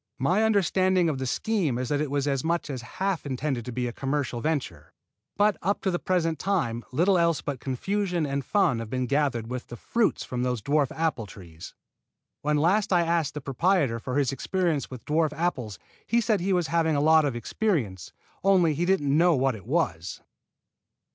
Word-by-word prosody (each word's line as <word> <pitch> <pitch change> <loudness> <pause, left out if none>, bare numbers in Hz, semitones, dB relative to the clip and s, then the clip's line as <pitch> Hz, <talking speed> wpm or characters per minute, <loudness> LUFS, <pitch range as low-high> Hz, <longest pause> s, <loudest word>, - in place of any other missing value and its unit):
My 175 +11 +2
understanding 185 -4 +2
of 140 -4 -2
the 130 - -2
scheme 175 - 0
is 125 0 -3
that 145 0 0
it 150 - -2
was 140 0 -1
as 135 -2 0
much 170 -2 -1
as 130 -3 -5 0.2
half 190 -2 -1
intended 130 -3 -3
to 125 - -5
be 125 +1 -2
a 120 - -3
commercial 135 -3 -2
venture; 125 - -3 0.4
but 205 -1 +3
up 200 +3 0
to 190 - 0
the 175 - -1
present 165 -4 0
time 120 -13 -1
little 175 +7 +3
else 170 -2 +2
but 140 -3 -4
confusion 175 +6 -1
and 140 -1 -2
fun 135 - +2
have 115 -1 -6
been 130 +1 -1
gathered 140 -4 0
with 125 +1 -5
the 120 - -8
fruit 230 - 0
from 125 -1 -4
those 125 -1 0
dwarf 145 -2 +1
apple 155 -9 -1
trees. 85 -4 -12 0.7
When 150 0 +1
last 190 +8 +2
I 175 -2 +4
asked 165 -4 0
the 150 - -4
proprietor 135 -2 +1
for 130 +3 -3
his 140 -3 +2
experience 165 +2 -1
with 130 -3 -9
dwarf 155 0 +1
apples 135 - -2 0.3
he 235 - +3
said 215 -3 +1
that 175 - -4
he 195 - +1
was 175 -2 +1
having 160 -1 +1
a - - +2
lot 160 +2 +5
of 140 -4 -1
experience, 120 - -2 0.3
only 185 -5 +4
he 165 +4 -1
didn't 145 -7 +2
know 170 +1 +4
what 135 0 +1
it 105 -5 -11
was. - - -1
150 Hz, 200 wpm, -26 LUFS, 130-175 Hz, 0.7 s, lot